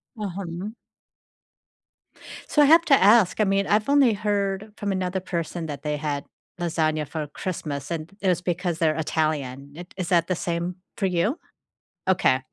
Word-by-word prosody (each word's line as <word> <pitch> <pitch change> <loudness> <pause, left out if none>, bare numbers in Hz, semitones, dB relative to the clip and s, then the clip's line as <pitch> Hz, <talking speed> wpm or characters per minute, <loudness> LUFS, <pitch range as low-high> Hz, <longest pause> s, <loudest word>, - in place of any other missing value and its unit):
Uh-huh. 190 -2 -5 1.8
So, 295 - +4
I - - +7
have 330 +3 +6
to 285 - +4
ask, 215 -5 +5
I - - +6
mean, 195 0 +1
I've 210 +4 +2
only 280 -5 +5
heard 205 0 -1
from 205 -1 -2
another 185 0 -1
person 170 -2 -4
that 145 -3 -6
they 150 -1 -1
had 145 -1 -2 0.4
lasagna 155 -3 0
for 155 0 -4
Christmas, 150 -3 -5
and 165 -1 -3
it 195 - 0
was 180 -1 +1
because 175 -1 -2
they're 155 -2 +2
Italian, 145 -4 -2
it 175 +2 -10
is 185 -3 -3
that 170 -3 +3
the 185 - 0
same 170 +1 -2 0.2
for - - -1
you? 185 - 0 0.7
Okay. 180 -8 +3
175 Hz, 165 wpm, -25 LUFS, 155-200 Hz, 1.8 s, I